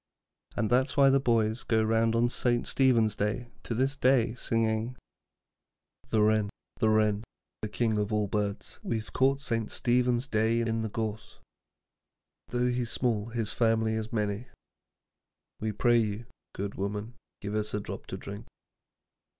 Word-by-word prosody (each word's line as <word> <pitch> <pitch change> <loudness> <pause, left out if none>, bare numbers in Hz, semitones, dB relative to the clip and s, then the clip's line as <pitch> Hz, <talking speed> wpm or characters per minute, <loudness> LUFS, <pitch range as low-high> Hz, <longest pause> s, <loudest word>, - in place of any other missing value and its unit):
And 110 +1 0
that's 130 +3 +2
why 135 -1 +7
the 135 - +4
boys 115 -3 +1
go 110 -1 +1
round 115 +1 +2
on 120 +1 +3
St. 120 0 +1
Stephen's 120 -5 +3
Day 115 +4 -2
to 115 - -4
this 135 +4 +1
day, 130 -4 +3
singing: 115 0 -1 1.1
The 110 -1 +3
Wren, 110 -1 +3 0.3
the 110 -2 +3
Wren, 110 -1 +2 0.4
the 105 - -3
King 110 0 0
of 105 +1 -1
all 105 -1 +1
Birds, 105 0 -3
We've 110 -1 -3
caught 135 +2 +2
St. 115 -5 -1
Stephen's 125 0 +1
Day 110 -1 +1
in 115 -1 0
the 110 - -2
gorse, 110 0 -4 1.1
Though 125 0 0
he's 125 -1 -1
small 110 -3 0
his 115 -2 -1
family 110 -1 +2
is 110 0 -3
many; 105 +1 -2 1.1
We 110 0 -1
pray 120 +3 +3
you, 110 +1 -2 0.3
good 100 +1 -3
woman, 105 +4 -4 0.3
give 100 0 -5
us 105 0 -1
a - - 0
drop 100 - -7
to - - -5
drink. 100 +1 -8
110 Hz, 155 wpm, -29 LUFS, 105-120 Hz, 1.1 s, why